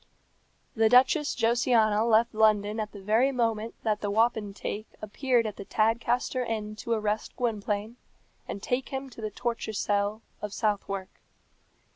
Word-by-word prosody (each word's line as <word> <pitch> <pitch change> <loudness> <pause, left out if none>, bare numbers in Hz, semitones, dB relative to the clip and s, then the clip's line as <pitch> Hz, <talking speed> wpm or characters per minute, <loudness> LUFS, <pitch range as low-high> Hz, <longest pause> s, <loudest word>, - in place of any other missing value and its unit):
The 220 -1 +4
Duchess 265 +5 +4
Josiana 230 -2 +3
left 230 +1 +3
London 215 0 +3
at 215 -1 -3
the 200 -2 -11
very 225 +7 +3
moment 230 -3 -1
that 215 -2 0
the 205 - -1
wapentake 215 -1 -1
appeared 235 +3 0
at 210 -2 -4
the - - -6
Tadcaster 235 +4 +1
Inn 215 -2 -3
to 235 - -2
arrest 215 -1 -2
Gwynplaine 215 -1 -2 0.5
and 200 - -6
take 250 +1 -1
him 270 0 -5
to 225 - -11
the 215 - -2
torture 230 +1 -3
cell 205 +1 0 0.2
of 210 -1 -5
Southwark. 200 -3 -2
220 Hz, 145 wpm, -28 LUFS, 210-235 Hz, 0.5 s, The